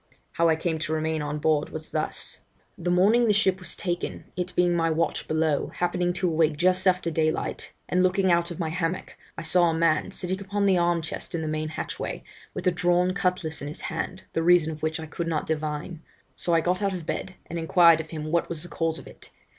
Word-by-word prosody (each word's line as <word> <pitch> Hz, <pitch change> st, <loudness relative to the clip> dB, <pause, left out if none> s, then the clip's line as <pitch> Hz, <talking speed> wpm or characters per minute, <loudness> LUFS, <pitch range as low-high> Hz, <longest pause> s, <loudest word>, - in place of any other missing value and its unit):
How 170 Hz, 0 st, +2 dB
I 160 Hz, -, +4 dB
came 160 Hz, 0 st, -2 dB
to 155 Hz, 0 st, -2 dB
remain 160 Hz, 0 st, -1 dB
on 150 Hz, 0 st, -3 dB
board 150 Hz, 0 st, +1 dB
was 155 Hz, 0 st, -7 dB
thus: 155 Hz, 0 st, -2 dB, 0.4 s
'The 175 Hz, +1 st, -3 dB
morning 205 Hz, +7 st, +4 dB
the 210 Hz, -, +4 dB
ship 190 Hz, -2 st, +2 dB
was 185 Hz, -, -3 dB
taken, 175 Hz, -2 st, -3 dB
it 180 Hz, 0 st, -2 dB
being 175 Hz, -1 st, +3 dB
my 165 Hz, -1 st, +2 dB
watch 160 Hz, +1 st, 0 dB
below, 155 Hz, -2 st, +1 dB
happening 175 Hz, 0 st, 0 dB
to 180 Hz, +1 st, 0 dB
awake 160 Hz, -2 st, +2 dB
just 185 Hz, +3 st, +2 dB
after 180 Hz, -2 st, +2 dB
daylight, 155 Hz, 0 st, -1 dB, 0.2 s
and 180 Hz, -, +2 dB
looking 185 Hz, 0 st, +3 dB
out 170 Hz, 0 st, +2 dB
of 170 Hz, -, -6 dB
my 165 Hz, -3 st, -2 dB
hammock, 170 Hz, +1 st, -3 dB, 0.2 s
I -, -, -5 dB
saw 175 Hz, +1 st, +3 dB
a 160 Hz, -, 0 dB
man 160 Hz, -2 st, +2 dB
sitting 185 Hz, +1 st, -3 dB
upon 200 Hz, +1 st, -1 dB
the 195 Hz, -2 st, +4 dB
arm 175 Hz, -1 st, +2 dB
chest 160 Hz, -, -5 dB
in 160 Hz, -, -2 dB
the -, -, -3 dB
main 155 Hz, 0 st, -2 dB
hatchway, 155 Hz, -, -5 dB, 0.3 s
with -, -, -5 dB
a 180 Hz, -, +5 dB
drawn 175 Hz, +1 st, +2 dB
cutlass 180 Hz, -4 st, -1 dB
in 145 Hz, -, -4 dB
his 150 Hz, -, -7 dB
hand, 180 Hz, +2 st, -4 dB
the 165 Hz, -, +1 dB
reason 170 Hz, -1 st, +4 dB
of 155 Hz, -1 st, -8 dB
which 160 Hz, +1 st, -1 dB
I 160 Hz, -, -5 dB
could 165 Hz, +2 st, -4 dB
not 160 Hz, -2 st, -1 dB
divine; 155 Hz, +1 st, -3 dB, 0.3 s
so 175 Hz, -, -2 dB
I 165 Hz, -, +4 dB
got 180 Hz, +4 st, 0 dB
out 195 Hz, -2 st, 0 dB
of 170 Hz, -3 st, -6 dB
bed 185 Hz, +3 st, -4 dB
and 170 Hz, -, -5 dB
inquired 170 Hz, 0 st, +6 dB
of 160 Hz, -1 st, -6 dB
him 155 Hz, -1 st, -5 dB
what 170 Hz, 0 st, +1 dB
was 165 Hz, -2 st, -3 dB
the 175 Hz, -, -8 dB
cause 165 Hz, -1 st, -1 dB
of -, -, -9 dB
it. -, -, -12 dB
170 Hz, 235 wpm, -26 LUFS, 160-180 Hz, 0.4 s, inquired